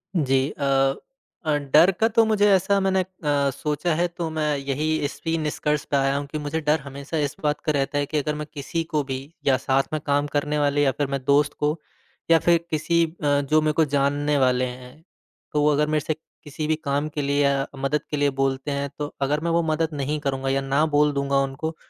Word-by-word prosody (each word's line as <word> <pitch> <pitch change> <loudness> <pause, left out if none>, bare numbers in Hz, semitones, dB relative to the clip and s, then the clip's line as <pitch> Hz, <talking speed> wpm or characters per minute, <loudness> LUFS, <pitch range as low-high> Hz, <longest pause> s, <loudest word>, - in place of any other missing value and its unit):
जी, 135 -3 +2
अ 135 -1 +2 0.5
अ, 150 -1 +2 0.2
डर 170 +5 +7
का 225 - +4
तो 230 0 +4
मुझे 210 -1 +3
ऐसा 195 +1 +3
मैंने 190 0 +1
अ, - - -4 0.5
सोचा 150 +4 -2
है 175 +2 +1
तो 170 -1 -5
मैं 155 -2 0
यही 140 +3 -1
इसी 165 +3 -2
निष्कर्ष 150 -1 -1
पर 140 - 0
आया 135 0 +1
हूँ 145 - -3
कि 155 - -5
मुझे 150 +2 -3
डर 150 +1 +2
हमेशा 140 +3 -6
इस - - -11
बात 150 0 +1
का 155 - +2
रहता 145 0 -1
है 145 - +1
कि 155 - -3
अगर 150 +1 -1
मैं 150 0 -5
किसी 160 +3 -3
को 150 -2 +2
भी 130 -1 -4 0.3
या 135 -2 +4
साथ 135 +1 +1
में 155 - 0
काम 145 0 +1
करने 150 +1 0
वाले 145 0 +2
या 135 - +3
फिर 145 +1 -2
मैं 135 -1 -3
दोस्त 145 +1 +3
को, 150 +2 0 0.5
या 165 - +7
फिर 170 -1 +4
किसी 165 +2 +1
अ, 145 -3 0
जो 155 +3 +2
मेरे 155 0 +1
को - - +5
जानने 145 +1 +1
वाले 130 -1 +2
हैं, 125 +4 -10 0.5
तो 150 - +2
वो 150 0 +4
अगर 150 +1 +2
मेरे 155 0 +1
से 155 - 0 0.3
किसी 150 +1 -5
भी 155 - +2
काम 140 +2 0
के 150 -1 -3
लिए 140 +1 +1
या 140 -1 +2
मदद 135 +2 0
के 150 - -1
लिए 145 0 +2
बोलते 135 +1 0
हैं 140 0 -2
तो 145 0 -4
अगर 145 +2 +1
मैं 170 - 0
वो 170 0 +3
मदद 160 0 0
नहीं 145 +1 -2
करूँगा 135 -2 -2
या 135 0 +1
ना 140 +3 +1
बोल 150 -1 +3
दूँगा 140 0 0
उनको, 155 +4 -4
145 Hz, 230 wpm, -24 LUFS, 140-155 Hz, 0.5 s, डर